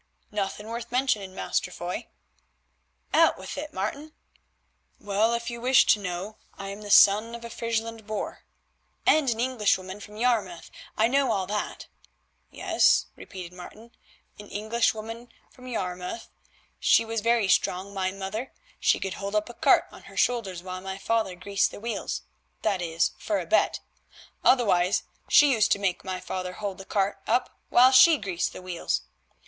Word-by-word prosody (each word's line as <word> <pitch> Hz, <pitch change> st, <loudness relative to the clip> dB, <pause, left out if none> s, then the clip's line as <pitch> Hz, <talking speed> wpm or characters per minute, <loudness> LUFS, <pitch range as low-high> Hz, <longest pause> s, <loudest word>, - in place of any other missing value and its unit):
"Nothing 210 Hz, 0 st, -3 dB
worth 235 Hz, +1 st, -6 dB
mentioning, 215 Hz, -7 st, 0 dB
Master -, -, -1 dB
Foy." 175 Hz, 0 st, -5 dB, 1.1 s
"Out -, -, +5 dB
with -, -, -7 dB
it, 295 Hz, +1 st, -6 dB
Martin." 285 Hz, +11 st, -4 dB, 0.9 s
"Well, 210 Hz, +3 st, +1 dB
if 235 Hz, 0 st, -4 dB
you 235 Hz, 0 st, -7 dB
wish 255 Hz, +1 st, +5 dB
to 210 Hz, -, +4 dB
know, 195 Hz, +2 st, -5 dB, 0.2 s
I 195 Hz, 0 st, -6 dB
am 200 Hz, +1 st, -7 dB
the 205 Hz, -, -8 dB
son 210 Hz, +4 st, +6 dB
of 235 Hz, 0 st, -9 dB
a 235 Hz, -, -8 dB
Friesland 225 Hz, -1 st, -3 dB
boor." 215 Hz, 0 st, -5 dB, 0.6 s
"—And 305 Hz, -4 st, +4 dB
an 225 Hz, -1 st, -1 dB
Englishwoman 210 Hz, -6 st, 0 dB
from 210 Hz, +1 st, -11 dB
Yarmouth: 215 Hz, -8 st, -1 dB, 0.3 s
I 220 Hz, -, +4 dB
know 275 Hz, +2 st, +2 dB
all 190 Hz, -2 st, 0 dB
that." 210 Hz, +2 st, -4 dB, 0.6 s
"Yes," -, -, +3 dB
repeated 180 Hz, -2 st, -9 dB
Martin, 215 Hz, +6 st, -12 dB, 0.5 s
"an 205 Hz, -, -10 dB
Englishwoman 225 Hz, +2 st, -2 dB, 0.2 s
from 255 Hz, 0 st, -14 dB
Yarmouth. 180 Hz, -2 st, -4 dB, 0.5 s
She 230 Hz, -, +4 dB
was 225 Hz, -1 st, -2 dB
very 230 Hz, -2 st, +2 dB
strong, 185 Hz, +1 st, +1 dB
my 190 Hz, -1 st, -1 dB
mother; 195 Hz, +6 st, -5 dB, 0.3 s
she -, -, +3 dB
could 195 Hz, -1 st, -3 dB
hold 200 Hz, +1 st, -5 dB
up 210 Hz, +2 st, 0 dB
a -, -, -8 dB
cart -, -, +4 dB
on -, -, -14 dB
her -, -, -13 dB
shoulders 200 Hz, -8 st, 0 dB
while 185 Hz, 0 st, -6 dB
my 190 Hz, 0 st, -5 dB
father 205 Hz, -2 st, -1 dB
greased 195 Hz, +2 st, 0 dB
the -, -, -10 dB
wheels, 230 Hz, +2 st, -4 dB, 0.4 s
that 200 Hz, -4 st, +1 dB
is 165 Hz, -1 st, 0 dB
for 310 Hz, -, -1 dB
a -, -, -5 dB
bet; -, -, +2 dB, 0.6 s
otherwise 195 Hz, -7 st, +3 dB, 0.3 s
she 290 Hz, -1 st, +7 dB
used 220 Hz, -4 st, +2 dB
to -, -, -1 dB
make 195 Hz, -3 st, -1 dB
my 185 Hz, -1 st, -4 dB
father 185 Hz, 0 st, -5 dB
hold 200 Hz, -1 st, -5 dB
the 195 Hz, -, -9 dB
cart 200 Hz, 0 st, -1 dB
up 245 Hz, +3 st, 0 dB
while 255 Hz, +2 st, +6 dB
she 295 Hz, +5 st, +8 dB
greased 190 Hz, -7 st, -2 dB
the -, -, -10 dB
wheels. 180 Hz, -2 st, -2 dB
210 Hz, 165 wpm, -26 LUFS, 190-235 Hz, 1.1 s, she